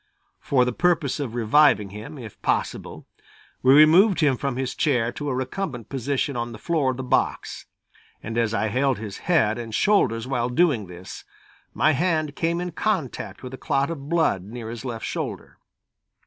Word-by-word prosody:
For 130 Hz, -3 st, +2 dB
the 125 Hz, -, -1 dB
purpose 165 Hz, -5 st, +1 dB
of 125 Hz, -5 st, -4 dB
reviving 115 Hz, -3 st, +4 dB
him, 110 Hz, +9 st, -9 dB
if 115 Hz, -6 st, -10 dB
possible, -, -, -2 dB, 0.6 s
we 130 Hz, +1 st, +6 dB
removed 170 Hz, +7 st, +6 dB
him 145 Hz, -5 st, +3 dB
from 135 Hz, 0 st, -3 dB
his 130 Hz, 0 st, -2 dB
chair 120 Hz, -5 st, +1 dB
to 145 Hz, +2 st, -5 dB
a 130 Hz, -, -1 dB
recumbent 130 Hz, -, -4 dB
position 135 Hz, +1 st, -2 dB
on 120 Hz, 0 st, -3 dB
the -, -, -8 dB
floor 160 Hz, -6 st, 0 dB
of 130 Hz, -, -2 dB
the 130 Hz, -, -4 dB
box, 125 Hz, -, -1 dB, 0.6 s
and 115 Hz, -, -5 dB
as 115 Hz, -2 st, +1 dB
I 110 Hz, -1 st, 0 dB
held 130 Hz, +3 st, +1 dB
his 105 Hz, -2 st, -7 dB
head 115 Hz, -10 st, +3 dB
and 115 Hz, -2 st, -5 dB
shoulders 120 Hz, -, +2 dB
while 125 Hz, -2 st, -1 dB
doing 130 Hz, -, +2 dB
this, 90 Hz, +1 st, -10 dB, 0.5 s
my 155 Hz, -, +4 dB
hand 155 Hz, -1 st, 0 dB
came 170 Hz, +1 st, 0 dB
in 180 Hz, 0 st, -3 dB
contact 170 Hz, -, -3 dB
with 125 Hz, 0 st, -7 dB
a -, -, -6 dB
clot 140 Hz, +4 st, 0 dB
of 140 Hz, -3 st, -7 dB
blood 160 Hz, -, +2 dB
near 115 Hz, +2 st, -7 dB
his 120 Hz, +1 st, -7 dB
left 120 Hz, -4 st, -5 dB
shoulder. -, -, -5 dB
130 Hz, 180 wpm, -24 LUFS, 115-155 Hz, 0.6 s, we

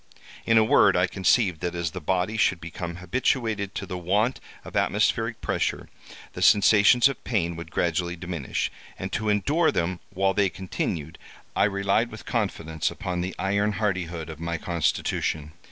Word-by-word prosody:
In 115 Hz, -, +5 dB
a 110 Hz, -, +7 dB
word, 110 Hz, -, +5 dB
I -, -, +4 dB
conceived 95 Hz, -3 st, +1 dB
that, 90 Hz, 0 st, -2 dB
as 85 Hz, -2 st, -2 dB
the 90 Hz, -, -6 dB
body 95 Hz, +6 st, 0 dB
should 95 Hz, -4 st, +2 dB
become 85 Hz, +1 st, -6 dB
habituated 105 Hz, +2 st, -1 dB
to -, -, -3 dB
the 90 Hz, -2 st, -5 dB
want 105 Hz, +8 st, +1 dB, 0.3 s
of -, -, -10 dB
atmospheric -, -, +1 dB
pressure, -, -, -2 dB, 0.4 s
the -, -, -7 dB
sensations 105 Hz, +5 st, +6 dB
of 135 Hz, -3 st, -5 dB
pain 85 Hz, -8 st, -1 dB
would 85 Hz, 0 st, -8 dB
gradually 85 Hz, +1 st, -1 dB
diminish—and 90 Hz, +2 st, -5 dB
to 110 Hz, -2 st, -1 dB
endure 145 Hz, -, +2 dB
them 90 Hz, +1 st, -1 dB
while 95 Hz, 0 st, +1 dB
they 100 Hz, -1 st, +2 dB
continued, 85 Hz, -4 st, -4 dB, 0.4 s
I -, -, +4 dB
relied 100 Hz, +3 st, +1 dB
with 110 Hz, -, -10 dB
confidence 85 Hz, -, -1 dB
upon 90 Hz, -1 st, -4 dB
the 90 Hz, +1 st, -4 dB
iron 100 Hz, +2 st, +1 dB
hardihood 90 Hz, -5 st, -2 dB
of 80 Hz, -, -10 dB
my 85 Hz, 0 st, -2 dB
constitution. 80 Hz, -2 st, -1 dB
95 Hz, 160 wpm, -25 LUFS, 85-105 Hz, 0.4 s, a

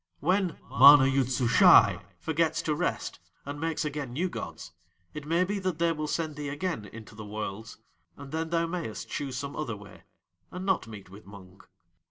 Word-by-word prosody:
When 185 Hz, -2 st, 0 dB
MANA 140 Hz, +2 st, +8 dB
YOOD 135 Hz, -1 st, +1 dB
SUSHAI 125 Hz, -2 st, +5 dB, 0.2 s
forgets 160 Hz, 0 st, 0 dB
to 155 Hz, -, 0 dB
rest 150 Hz, -, -3 dB, 0.3 s
and 145 Hz, +1 st, -6 dB
makes 165 Hz, -1 st, -1 dB
again 145 Hz, -4 st, -4 dB
new 180 Hz, +7 st, -1 dB
gods -, -, -7 dB, 0.4 s
it 150 Hz, -1 st, -8 dB
may 170 Hz, +3 st, +2 dB
be 200 Hz, +2 st, -2 dB
that 185 Hz, -4 st, -2 dB
They 170 Hz, 0 st, +2 dB
will 155 Hz, -1 st, -3 dB
send 155 Hz, -1 st, -3 dB
thee 145 Hz, -1 st, -4 dB
again 145 Hz, -, -3 dB
into 110 Hz, +2 st, -12 dB
the 110 Hz, +1 st, -9 dB
Worlds; 105 Hz, +1 st, -6 dB, 0.4 s
and 140 Hz, -1 st, -10 dB
then 160 Hz, +1 st, -3 dB
thou 170 Hz, 0 st, +1 dB
mayest 165 Hz, -10 st, -5 dB
choose 135 Hz, -3 st, -4 dB
some 140 Hz, +1 st, -5 dB
other 115 Hz, -8 st, -4 dB
way, 100 Hz, -1 st, -14 dB, 0.5 s
and 180 Hz, +1 st, -7 dB
not 190 Hz, -10 st, 0 dB
meet 105 Hz, -4 st, -11 dB
with 100 Hz, +1 st, -14 dB
Mung." 95 Hz, -2 st, -14 dB
145 Hz, 185 wpm, -28 LUFS, 115-165 Hz, 0.5 s, MANA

